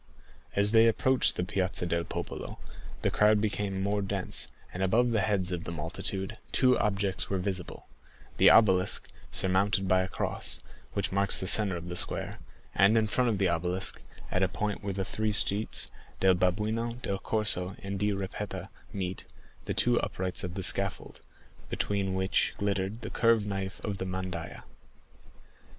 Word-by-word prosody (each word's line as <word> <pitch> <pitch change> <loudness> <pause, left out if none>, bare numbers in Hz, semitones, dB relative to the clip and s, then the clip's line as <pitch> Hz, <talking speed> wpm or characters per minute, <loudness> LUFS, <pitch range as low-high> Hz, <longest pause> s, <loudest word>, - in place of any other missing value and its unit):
As 100 +1 +3
they 115 0 +6
approached 130 +3 +3
the - - -1
Piazza 95 -2 -1
del 85 0 -1
Popolo, - - -6 0.5
the - - +2
crowd 105 0 +4
became 100 -2 -2
more 100 +1 0
dense, 95 -1 -1 0.3
and 90 - -5
above 115 +6 +2
the 110 -3 +1
heads 95 -2 0
of 85 -1 -3
the - - -6
multitude 95 +6 -4
two 125 -1 +4
objects 100 -2 -1
were 95 - 0
visible: 95 -1 -4 0.5
the - - +7
obelisk, 95 -4 +4 0.2
surmounted 95 +1 +2
by 95 0 +3
a 95 - -2
cross, - - -4 0.3
which - - -2
marks 100 +1 +3
the - - -3
centre 95 -1 +5
of 85 +1 -8
the 90 - -5
square, - - +2 0.3
and 100 +4 +4
in 110 - +3
front 120 +3 +1
of 110 - 0
the 95 -1 +2
obelisk, 90 +2 -2 0.3
at 90 - +1
the 95 - +3
point 105 +2 -3
where 100 - -2
the 95 -1 -2
three 110 +2 -2
streets, 105 0 +4 0.3
del 95 -1 +5
Babuino, 110 +6 -1
del 100 0 -2
Corso, 95 -4 +1
and 100 0 -4
di 105 +1 +1
Ripetta, 95 -1 -5 0.2
meet, 95 -3 -4 0.4
the - - -2
two 120 0 +3
uprights 90 0 -2
of 90 -1 -5
the 95 - -4
scaffold, - - -1 0.5
between 100 -2 -1
which 95 0 0
glittered 100 +2 -2
the 110 - -6
curved 115 -3 +3
knife 95 -1 -4
of 100 -2 -4
the 95 - -3
mandaïa. 95 -2 -5
95 Hz, 170 wpm, -29 LUFS, 95-105 Hz, 0.5 s, the